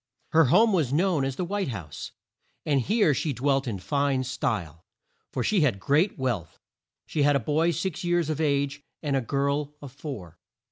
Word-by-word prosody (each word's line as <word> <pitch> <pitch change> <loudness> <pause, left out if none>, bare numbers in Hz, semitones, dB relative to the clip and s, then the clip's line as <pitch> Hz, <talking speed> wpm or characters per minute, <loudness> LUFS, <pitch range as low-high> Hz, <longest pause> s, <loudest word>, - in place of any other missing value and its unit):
Her 160 0 +5
home 215 - +5
was 155 -9 +1
known 165 -1 +2
as 135 -1 -2
the 180 - -2
White 200 +1 -2
House, 90 - -6 0.5
and 140 -3 +2
here 205 - +3
she 145 +2 -1
dwelt 135 +2 +1
in 110 -4 -2
fine 140 +6 0
style, 100 -10 -3 0.5
for - - -2
she 210 -5 +2
had 125 -10 +2
great 150 - +2
wealth. 120 - -3 0.5
She 150 - -2
had 145 0 +4
a - - +3
boy 150 +7 +1
six 170 +1 -2
years 175 -2 +1
of 155 0 -2
age, 140 -1 0 0.2
and 145 -2 0
a 135 - +2
girl 140 +3 -1
of 140 -3 -9
four. 125 - -8
140 Hz, 185 wpm, -26 LUFS, 130-160 Hz, 0.5 s, Her